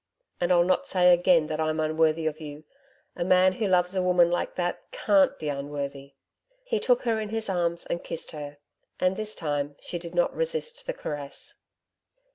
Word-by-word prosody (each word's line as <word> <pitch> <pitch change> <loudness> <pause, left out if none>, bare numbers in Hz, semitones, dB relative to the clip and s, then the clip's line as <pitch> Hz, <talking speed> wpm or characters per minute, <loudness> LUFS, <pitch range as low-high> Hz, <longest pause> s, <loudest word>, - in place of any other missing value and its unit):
And 175 0 +1
I'll 175 -1 +5
not 185 +1 +1
say 180 -1 +5
again 175 -2 +4
that 155 0 -4
I'm 155 0 0
unworthy 155 +1 +1
of 155 0 -2
you 150 0 -8 0.5
a - - -2
man 185 +1 +4
who 210 +2 -1
loves 180 -1 +2
a 185 - +2
woman 180 -1 +4
like 175 - -1
that 175 -1 -2
CAN'T 300 - +3
be 155 - -5
unworthy.' 140 -1 -5 0.5
He 475 -3 -1
took 250 -1 +2
her 230 -3 +1
in 215 -1 -4
his 225 -1 -3
arms 170 -2 -1
and 170 - -3
kissed 165 - -5
her. 145 -2 -8 0.4
And 185 +1 +2
this 215 +1 -3
time 145 -2 -2
she 175 - -5
did 170 +1 -9
not 175 - +1
resist 485 0 -3
the - - -1
caress. 145 - -7
175 Hz, 190 wpm, -27 LUFS, 155-190 Hz, 0.5 s, I'll